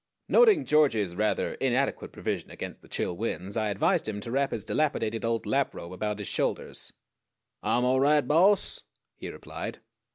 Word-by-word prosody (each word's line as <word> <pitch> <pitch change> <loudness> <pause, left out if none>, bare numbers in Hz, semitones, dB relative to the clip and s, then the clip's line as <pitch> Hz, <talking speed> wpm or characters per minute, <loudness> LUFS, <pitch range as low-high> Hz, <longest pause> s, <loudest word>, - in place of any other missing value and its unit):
Noting 430 - +5
George's 125 - +3
rather 105 +2 0
inadequate 135 +1 -1
provision - - -4
against - - -7
the - - -17
chill 90 - -2
winds, 95 -1 -4
I 110 -2 0
advised 100 -1 +1
him 105 -1 -3
to 115 - -6
wrap 135 +2 +1
his 105 - -4
dilapidated 115 -7 0
old 115 -2 -1
lap - - 0
robe 85 +2 -8
about 105 +2 -2
his 105 -3 -5
shoulders. - - -2 0.7
"Ah'm 125 +1 +1
all 130 +1 +3
right, 145 0 +3
Boss," 185 +7 +3 0.3
he - - -7
replied. - - -7
115 Hz, 165 wpm, -28 LUFS, 105-145 Hz, 0.7 s, Noting